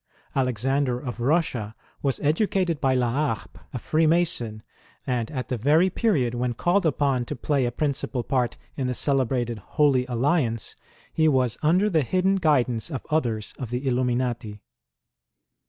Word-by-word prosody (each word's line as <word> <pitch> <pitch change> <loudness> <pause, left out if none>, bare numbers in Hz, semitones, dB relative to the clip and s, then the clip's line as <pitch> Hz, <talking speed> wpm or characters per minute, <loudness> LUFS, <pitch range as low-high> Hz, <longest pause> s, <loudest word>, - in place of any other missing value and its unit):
Alexander 130 +1 0
of 125 -3 -6
Kussia 120 -5 0 0.3
was 135 -2 0
educated 170 0 +1
by 135 -3 +2
La 125 -2 +1 0.2
Harpe, - - -16
a 135 - -4
Freemason, 155 -7 +1 0.4
and 120 -3 -1
at 130 -4 -5
the 125 -3 -2
very 155 - +4
period 150 - +1
when 120 0 -1
called 175 - +2
upon 140 -4 +1
to - - -5
play 135 +1 0
u - - +1
principal 130 -1 -2
part 125 -2 0 0.2
in 130 -3 -2
the 125 - -2
celebrated 125 -5 0 0.2
^'Holy 140 -4 +4
Alliance," 120 -2 0 0.4
he 160 -1 +3
was 130 -5 +2
under 180 +7 +3
the 165 -7 +2
hidden 185 +7 +1
guidance 130 - +1
of 135 -6 -5
others 115 -9 -1
of 125 - -5
the 125 +3 -3
Illuminati. 120 -4 -1
130 Hz, 150 wpm, -25 LUFS, 120-155 Hz, 0.4 s, very